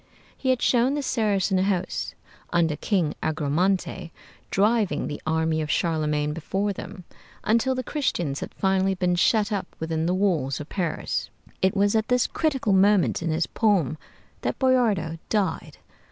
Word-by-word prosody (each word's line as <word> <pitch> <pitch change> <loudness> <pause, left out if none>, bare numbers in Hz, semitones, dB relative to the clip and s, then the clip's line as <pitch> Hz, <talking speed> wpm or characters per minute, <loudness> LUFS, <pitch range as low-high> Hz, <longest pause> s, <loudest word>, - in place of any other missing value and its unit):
He 265 - -2
had 255 -1 +2
shown 250 +3 +3
the 290 - -2
Saracen 205 -6 +1
host 185 -1 -1 0.4
under 165 -3 +2
King 175 -4 0
Agramante 160 +4 0 0.4
driving 210 0 +1
the 145 - -5
army 160 0 +1
of 155 - -4
Charlemagne 150 -3 0
before 195 +6 -2
them, 190 0 -9 0.4
until 235 +4 +2
the 255 - -2
Christians 175 - -1
had - - -6
finally 190 0 +1
been 180 -1 +1
shut 210 +4 +2
up 200 -3 -2
within 160 0 -1
the 180 - +1
walls 170 -9 0
of 150 - -8
Paris. 175 -5 -2 0.3
It 190 +1 +2
was 200 +1 +3
at 220 0 +1
this 250 -1 +3
critical 270 -10 0
moment 195 -1 +3
in 165 - -2
his 160 +1 +1
poem 180 - +1 0.4
that - - -2
Boiardo 215 - +2
died. 210 -3 -1
190 Hz, 155 wpm, -25 LUFS, 160-215 Hz, 0.4 s, shown